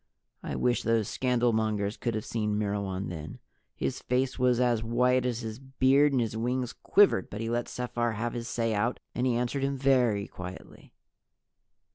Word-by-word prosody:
I - - -4
wish 120 -1 +1
those 115 -3 +1
scandalmongers 110 -5 +1
could 120 -2 -1
have 110 - -3
seen 105 -2 -1
Myrwan 100 -2 -2
then. 80 -3 -7 0.4
His - - -2
face 130 +1 0
was 125 -1 +3
as 120 -3 +2
white 125 +2 +2
as 120 -1 -2
his 110 0 -6
beard 135 +2 +3
and 135 - +2
his 115 -2 -1
wings 125 +2 -1
quivered, 200 - +3
but 105 - -6
he 115 +1 -2
let 120 0 -1
Sephar 120 -1 -2
have 115 +3 -3
his 115 -1 -4
say 115 -1 -1
out 110 +4 0
and 125 +1 0
he 125 - +2
answered 125 +3 -1
him 140 0 0
very 125 -7 +2
quietly. 90 0 -10
120 Hz, 175 wpm, -29 LUFS, 110-125 Hz, 0.4 s, was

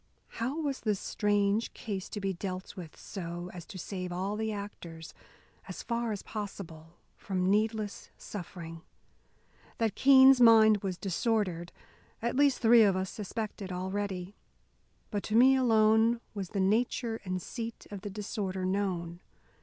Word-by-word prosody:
How 265 +7 -1
was 285 -4 -2
this 210 -3 0
strange 205 +1 0
case 195 -4 -5
to 210 - -5
be 195 -1 -1
dealt 185 +1 -6
with 170 -4 -9
so 175 -2 -6
as 175 -2 -9
to 190 - -9
save 185 0 -5
all 190 +4 -2
the 220 0 -2
actors, 175 -6 -8 0.5
as - - -7
far 235 -1 -1
as 205 - -4
possible, 175 -6 -7 0.2
from 185 -1 0
needless 215 0 -1
suffering? 170 -4 -8 1.0
That 225 -3 +1
Keene's 265 0 +7
mind 220 -2 +7
was 190 -3 -4
disordered 190 -3 -1 0.5
at 235 +2 -2
least 280 -1 +4
three 230 +1 +7
of 200 -3 +5
us 185 0 -2
suspected 210 -2 -5
already. 190 0 -3 0.8
But 205 - -1
to 215 - -1
me 260 +3 +7
alone 225 -2 +4
was 195 -4 -5
the 200 - -3
nature 225 +3 +1
and 185 -1 -2
seat 230 +4 -6
of 200 -2 -6
the 205 - -5
disorder 195 -2 -3
known. 185 -3 -2
205 Hz, 145 wpm, -30 LUFS, 185-225 Hz, 1.0 s, Keene's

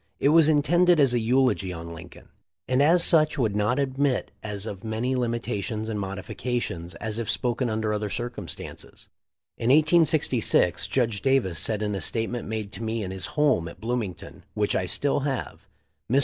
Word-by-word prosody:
It 140 - +3
was 160 0 +6
intended 170 +3 +4
as 135 -4 +4
a 120 - +2
eulogy 120 -5 +1
on 85 -1 -7
Lincoln, 80 - -12 0.4
and 130 +2 +2
as 170 +4 +5
such 155 -3 +4
would 110 -6 0
not 105 +5 +1
admit 135 -1 0
of 105 - -5
as 105 +1 -4 0.2
many 115 +4 -1
limitations 115 -2 -2
and 105 -2 -3
modifications 95 -1 -4
as 110 0 -4
if 115 - -3
spoken 125 0 0
under 110 -1 -1
other 105 0 -2
circumstances. 120 -5 -7 0.5
In 115 - 0
186G 150 - +3
Judge 115 -6 0
Davis 130 -11 +2
said 110 -1 -1
in 105 -1 -1
a 95 - -3
statement 115 +1 -3
made 110 -2 -4
to 100 - -7
me 110 0 -2
in 95 - -5
his 95 -1 -3
home 145 - +3
at 85 - -10
Bloomington, 115 -5 -4
which 105 -1 0
I 90 - 0
still 140 +10 0
have. 135 -2 -4 0.4
"Mr. 135 - +5
115 Hz, 175 wpm, -25 LUFS, 105-135 Hz, 0.5 s, was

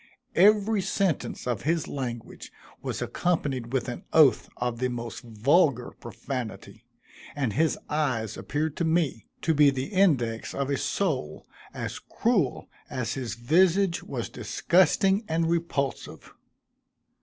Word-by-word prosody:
Every 210 +2 +4
sentence 190 -3 -1
of 120 -5 -1
his 160 +1 0
language 120 -4 -6 0.3
was - - -3
accompanied 140 -9 -1
with 130 -1 -1
an 120 +10 -5
oath 155 -5 +5
of 120 -1 -2
the 125 - +1
most 120 -2 -5
vulgar 125 - +2
profanity, 120 0 -7 0.5
and 135 -7 -1
his 160 +5 +2
eyes 130 -8 -1
appeared 150 +1 -2
to 175 - 0
me 160 -8 0 0.2
to 160 - +2
be 150 -1 +6
the 135 +2 -3
index 140 - +1
of 140 0 -1
a 140 - +1
soul 145 - -2 0.3
as - - -5
cruel 205 - 0 0.2
as 120 -3 -2
his 130 -4 -4
visage 170 - +3
was 120 -4 -4
disgusting 190 - +2
and 165 +1 0
repulsive. 160 -6 -3
140 Hz, 130 wpm, -27 LUFS, 120-170 Hz, 0.5 s, be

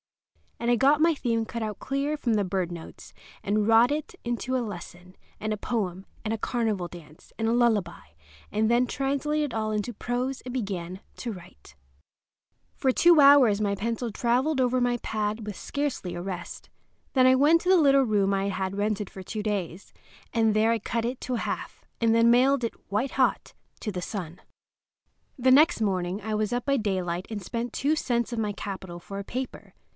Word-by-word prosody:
And 235 - -1
I - - +5
got 280 +5 +4
my 330 0 +4
theme 230 -4 -1
cut 230 0 -4
out 215 -2 -4
clear 280 +2 -1
from 240 -6 0
the 210 -2 +2
bird 185 -2 -2
notes, 170 -2 -10 0.3
and 210 +1 +1
wrought 230 +3 +6
it 300 +3 -3
into 240 +2 -2
a 255 - +1
lesson, 180 -2 -9 0.2
and 215 0 -2
a - - -3
poem, 195 -4 -3 0.2
and 220 - 0
a - - -1
carnival 215 -7 -1
dance, 160 -3 -14
and 225 - -1
a - - +2
lullaby; 215 - +1 0.4
and 220 +1 +1
then 240 +1 +4
translated 280 +2 -1
it - - -4
all 215 -1 -1
into 215 +3 -2
prose 250 +4 -3
and 250 - -7
began 190 -6 -4 0.2
to 240 - -4
write. 120 - -13 1.0
For 265 - +2
two 340 +4 +5
hours 275 -7 +7
my 200 -1 +1
pencil 230 +3 -3
traveled 255 +7 +1
over 255 0 +2
my 245 0 +1
pad 215 -1 -3
with 210 -2 -5
scarcely 280 -11 -3
a 175 - -4
rest. 180 -1 -7 0.4
Then 255 -2 +5
I 255 - +7
went 305 +5 +5
to 360 - -2
the 375 - +7
little 275 -4 +5
room 205 -4 +2
I 195 0 0
had 190 0 -3
rented 210 -1 -1
for 190 - -9
two 215 +3 -4
days, 200 -4 -4 0.4
and 225 -2 +2
there 220 +1 +3
I 230 - +1
cut 230 +2 -2
it 245 +2 -3
to 255 - -2
half, - - -4
and 230 -1 +3
then 230 +1 +5
mailed 260 +2 +4
it, 230 - -1 0.2
white 225 +7 0
hot, 260 -1 0 0.3
to 215 - -3
the 180 -2 -4
Sun. 180 -4 -6 1.0
The 255 +1 +4
next 300 0 +5
morning 185 -1 -1
I 215 +1 -2
was 215 +1 -1
up 245 0 -2
by 275 -1 +2
daylight 185 -5 -2
and 210 -2 -4
spent 230 +5 -4
two 290 +4 +1
cents 240 -5 -1
of - - -3
my 210 -2 0
capital 190 -3 -6
for 195 +3 -8
a - - -4
paper. 255 +5 -6
225 Hz, 200 wpm, -27 LUFS, 200-255 Hz, 1.0 s, hours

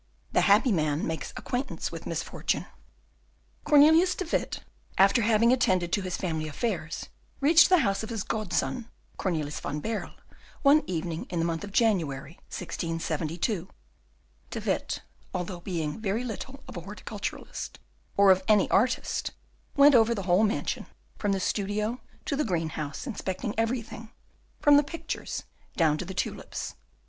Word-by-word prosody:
The - - +3
Happy 210 +5 +5
Man 155 -4 +1
makes 160 0 -3
Acquaintance 255 +2 -3
with - - -7
Misfortune - - -2 1.0
Cornelius 315 +5 +6
de 375 - -3
Witt, 330 - -1 0.4
after 195 +5 +5
having 230 +2 +4
attended 185 -8 +2
to 205 - +2
his 185 -2 -3
family 160 -4 -2
affairs, 165 -1 -3 0.3
reached 315 +4 +7
the 365 - +7
house 195 -2 +1
of 220 - -5
his 225 -4 -2
godson, 220 +3 -2 0.3
Cornelius 155 -6 -2
van 150 - -3
Baerle, 220 +6 -4 0.5
one 290 +2 +7
evening 165 -2 -3
in 180 - -3
the 165 - +1
month 165 -1 -2
of 205 - -7
January, 165 - +1
1672. 165 +2 -2 0.8
De - - -4
Witt, - - -2 0.3
although 180 0 -3
being 170 -2 -3
very 215 +2 -1
little 260 +4 -6
of - - -9
a 175 - -4
horticulturist 205 +2 -6 0.4
or 200 -1 +7
of 185 0 +4
an 210 -2 +5
artist, 235 +5 +1 0.5
went 285 0 +7
over 230 -1 +5
the 200 - -3
whole 185 +3 +4
mansion, 215 +1 -1 0.3
from 205 - +1
the 195 - +1
studio 210 +5 -1 0.2
to 280 - -1
the 300 - +1
green 170 - -1
house, 150 -2 -5
inspecting 210 -3 -3
everything, 225 0 -2 0.5
from 290 -1 +7
the 290 - +5
pictures 325 +4 -5 0.3
down 155 -3 +4
to - - -3
the 190 +1 -7
tulips. - - -3
200 Hz, 150 wpm, -28 LUFS, 170-235 Hz, 1.0 s, reached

